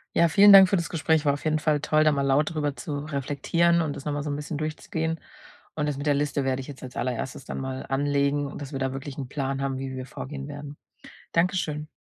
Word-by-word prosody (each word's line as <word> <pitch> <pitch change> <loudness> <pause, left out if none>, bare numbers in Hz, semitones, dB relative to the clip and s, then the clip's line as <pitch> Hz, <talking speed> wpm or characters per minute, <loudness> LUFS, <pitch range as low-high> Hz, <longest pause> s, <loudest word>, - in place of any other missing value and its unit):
Ja, 170 - +5
vielen 200 +4 +8
Dank 190 -1 +10
für - - +2
das 170 -3 -1
Gespräch. 160 -1 +1
War 140 - +4
auf 140 - -6
jeden 155 0 +1
Fall 150 -1 +1
toll, 155 +1 +2
da 155 - +5
mal 140 -1 0
laut 140 +4 +2
drüber 150 -3 -1
zu 145 -2 -4
reflektieren 155 +4 +1
und 145 -3 -2
das 140 - -9
noch 150 - -1
mal 145 - -2
so 150 - -4
'n 145 - -1
bisschen 150 +1 -5
durchzugehen. 160 +1 -3 0.5
Und 150 -1 -1
das 140 - -3
mit 140 - -5
der 145 - +3
Liste 145 0 0
werde 130 0 0
ich - - -10
jetzt 135 -2 -10
als 125 -1 -9
Allererstes 125 +2 -3
dann - - -5
mal 130 0 -4
anlegen 140 +1 +1
und 140 - -7
dass 140 +1 -7
wir - - -2
da 130 0 -1
wirklich 135 0 -7
'n 135 -3 -4
Plan 135 0 -3
haben, 135 -1 -2
wie 130 -1 -5
wir 130 - -5
vorgehen 135 +2 -7
werden. 145 0 -8 0.6
Danke 180 +3 +2
schön. 150 -2 -3
145 Hz, 260 wpm, -26 LUFS, 135-155 Hz, 0.6 s, Dank